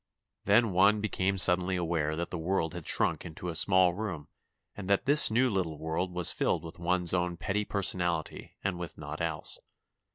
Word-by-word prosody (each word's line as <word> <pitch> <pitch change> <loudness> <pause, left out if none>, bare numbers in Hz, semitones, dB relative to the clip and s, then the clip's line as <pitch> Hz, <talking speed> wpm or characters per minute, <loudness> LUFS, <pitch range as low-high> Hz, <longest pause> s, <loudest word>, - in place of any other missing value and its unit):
Then 105 +2 +4
one 100 +4 +4
became 100 -2 -1
suddenly 90 0 +3
aware 80 -3 -1
that 85 +2 -4
the 85 - -3
world 80 -1 -1
had 90 -4 -7
shrunk - - +1
into 85 +2 -7
a - - -4
small 95 +1 +3
room 90 -7 -6 0.5
and 100 -2 -7
that 100 - +2
this 145 +2 +6
new 120 +4 +2
little 95 -8 -2
world 80 +4 -3
was 90 -1 +2
filled - - -1
with 85 +1 -10
one's 90 0 +2
own 90 -1 -1
petty 105 +4 -2
personality 90 -5 -2
and 95 -2 -2
with 85 -2 -7
naught 75 +1 -7
else. 80 -2 -2
90 Hz, 185 wpm, -29 LUFS, 85-95 Hz, 0.5 s, this